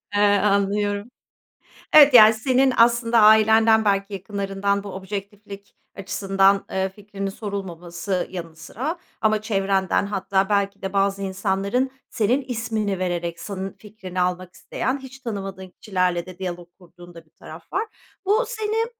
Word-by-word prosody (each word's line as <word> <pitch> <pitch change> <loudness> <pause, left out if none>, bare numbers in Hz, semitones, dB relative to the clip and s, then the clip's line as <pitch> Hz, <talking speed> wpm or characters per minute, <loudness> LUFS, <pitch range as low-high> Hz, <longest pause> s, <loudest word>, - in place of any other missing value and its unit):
Eee, 205 - +3 0.2
anlıyorum. 205 +1 0 0.9
Evet, 290 -2 +8
yani 220 -2 +9
senin 255 +3 +2
aslında 235 0 +4
ailenden, 220 +1 +5
belki 200 0 0
yakınlarından 200 0 -2
bu 205 - -7
objektiflik 200 +1 -8 0.2
açısından, 195 0 +1
eee, 190 0 -1
fikrinin 195 0 -6
sorulmaması 185 -3 -5
yanı 170 -3 -7
sıra, 260 - -5 0.2
ama 215 -1 +2
çevrenden, 195 -3 0
hatta 195 -1 -1
belki 200 -1 0
de 190 0 -5
bazı 195 0 +1
insanların, 195 +6 -1 0.2
senin 235 +6 +1
ismini 225 -6 -3
vererek, 175 -2 -3
senin 195 0 -6
fikrini 195 -3 -6
almak 180 0 -2
isteyen, 260 +3 -3
hiç 265 0 -12
tanımadığın 195 -6 -6
kişilerle 180 -2 -1
de 185 -1 -11
diyalog 175 -2 -6
kurduğun 175 0 -16
da 165 - -13
bir - - -34
taraf - - -13
var. - - +1 0.4
Bu 430 +5 +3
seni, 445 -1 -1
200 Hz, 135 wpm, -22 LUFS, 190-220 Hz, 0.9 s, yani